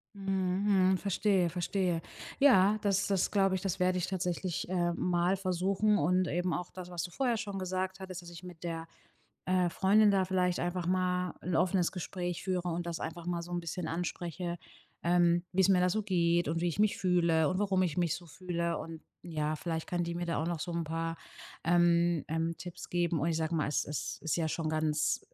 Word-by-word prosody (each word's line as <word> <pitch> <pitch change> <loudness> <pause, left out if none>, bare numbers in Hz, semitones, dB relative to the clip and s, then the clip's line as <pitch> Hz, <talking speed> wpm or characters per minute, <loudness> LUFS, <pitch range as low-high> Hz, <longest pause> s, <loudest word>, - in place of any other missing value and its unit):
Mhm, 190 0 +2
mhm, - - +2
verstehe, 195 -2 +1
verstehe. 175 0 -1 0.4
Ja, 215 -7 +6
das 200 -1 +2
das 195 -3 +1
glaube 195 -2 +2
ich. 185 - -3
Das 190 -2 -2
werde 185 0 +2
ich 180 - -1
tatsächlich, 180 -2 -2
äh, 175 -2 +1
mal 180 +2 +1
versuchen. 195 +3 +1
Und 180 +4 +2
eben 175 0 0
auch 180 +2 -4
das, 180 -1 -8
was 175 -2 -3
du 175 - -6
vorher 245 +1 0
schon 200 -3 -4
gesagt 185 +1 -2
hattest, 185 -1 -7
dass 175 - -11
ich 170 +1 -11
mit 180 -2 -11
der, 165 -1 -4 0.6
äh, 185 -1 +2
Freundin 205 +4 +4
da 195 -1 +3
vielleicht 180 -1 +1
einfach 175 0 -2
mal 180 0 0
'n 180 - -2
offenes 180 0 +2
Gespräch 175 -1 -4
führe 180 -2 -1
und 170 0 -2
das 170 -1 -4
einfach 165 +1 -6
mal 175 -1 -1
so 175 +1 -8
'n 175 - -1
bisschen 170 0 -4
anspreche, 175 +1 -3 0.5
ähm, 175 0 +3
wie 190 - +2
es 190 - +5
mir 190 -2 +5
da 180 0 +3
so 215 +4 0
geht 175 -4 +2
und 165 +2 -1
wie 175 - +2
ich 170 - -4
mich 210 0 +3
fühle 170 -3 +3
und 185 - -1
warum 195 -2 +2
ich 175 -3 -1
mich 170 -3 +2
so 175 - -8
fühle. 170 0 -2
Und 160 -1 -8 0.2
ja, 155 -3 -2
vielleicht 160 0 -3
kann 175 -1 -1
die 170 0 -3
mir 175 +1 -2
da 170 -3 -1
auch - - -2
noch 170 -2 -2
so 175 - -4
'n 170 0 -1
paar, 165 +1 -3 0.5
ähm 175 -1 +3
ähm, 165 +1 -1
Tipps 175 -1 -8
geben. 175 -2 0
Und 160 - +1
ich 165 - 0
sage 160 +1 -1
mal, 155 -3 +1
es 145 - 0
es 150 0 -4
ist 160 - 0
ja 165 -2 0
schon 155 0 -2
ganz 155 -1 +1
175 Hz, 220 wpm, -31 LUFS, 170-185 Hz, 0.6 s, Ja